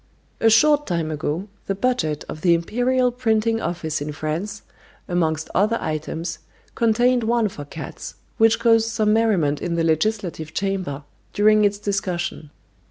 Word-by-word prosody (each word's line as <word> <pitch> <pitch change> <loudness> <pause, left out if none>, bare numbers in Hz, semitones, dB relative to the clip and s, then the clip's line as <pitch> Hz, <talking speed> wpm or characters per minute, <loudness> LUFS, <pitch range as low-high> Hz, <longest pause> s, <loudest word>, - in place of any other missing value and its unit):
A 225 - +4
short 295 +6 +4
time 170 -3 -1
ago, 155 +5 -3 0.2
the 195 - -1
budget 190 -10 -1
of 155 - -7
the 170 -1 +4
Imperial 245 +8 +1
Printing 225 -2 +1
Office 160 -3 -3
in 150 +1 -3
France, 155 +7 -4 0.4
amongst 160 -3 0
other 215 +4 +2
items, 160 +2 -4 0.3
contained 240 +2 +2
one 230 -1 +1
for 145 -6 -9
cats, 150 +2 -8 0.2
which 225 0 +5
caused 225 -1 +3
some 215 -2 +1
merriment 195 -11 +2
in 175 -1 -2
the 165 - +1
legislative 165 -1 -1
chamber 185 -8 -2 0.3
during 215 +1 +4
its 205 0 +2
discussion. 185 -6 -3
195 Hz, 145 wpm, -22 LUFS, 160-225 Hz, 0.4 s, which